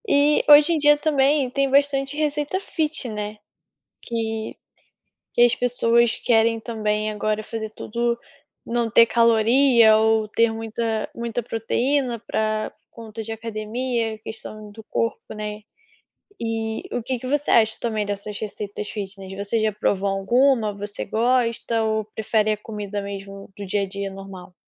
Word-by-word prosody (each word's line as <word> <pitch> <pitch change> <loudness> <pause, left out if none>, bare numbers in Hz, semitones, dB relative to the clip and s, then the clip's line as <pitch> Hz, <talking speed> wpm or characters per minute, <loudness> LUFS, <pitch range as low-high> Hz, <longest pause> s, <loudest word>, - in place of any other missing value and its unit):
E, 290 -2 +4
hoje 295 +3 +8
em - - +2
dia 295 0 +5
também, 290 -2 +2
tem 275 +2 0
bastante 275 0 +2
receita 300 +3 -1
fit, 315 -7 -2
né. 210 0 -5 0.6
Que 225 -1 -3 0.8
que - - +2
as 240 0 +5
pessoas 235 -1 +2
querem 225 -1 +3
também 215 -2 -1
agora 215 0 -1
fazer 220 0 -5
tudo 235 +2 -2 0.5
não 235 -1 -1
ter 230 +1 +7
caloria 230 0 +5
ou 220 -1 +2
ter 230 +2 +3
muita 225 0 -3
muita 235 0 -3
proteína 240 +3 0
pra 215 0 -1 0.2
conta 225 -1 -9
de 225 +1 -6
academia. 225 +1 -3
Questão 215 -1 -8
do 220 +2 -11
corpo, 230 0 -2
né. 210 0 -5 0.8
Eh, 225 +8 -3
o - - -2
que 255 +1 -2
que 255 - -6
você 290 +2 0
acha 220 -1 +4
também 220 -3 -1
dessas 205 0 -5
receitas 205 -1 -5
fitness, 195 -2 -7
você 200 +3 -1
já 215 0 +2
provou 200 -1 0
alguma, 225 +3 +2
você 205 0 -5
gosta, 230 0 +1
ou 220 -1 0
prefere 215 -1 +1
a 215 - 0
comida 205 -1 -5
mesmo 195 0 -8
do 200 - -6
dia 200 +2 0
a - - -3
dia 200 0 -5
normal? 190 -2 -10
225 Hz, 150 wpm, -23 LUFS, 210-245 Hz, 0.8 s, hoje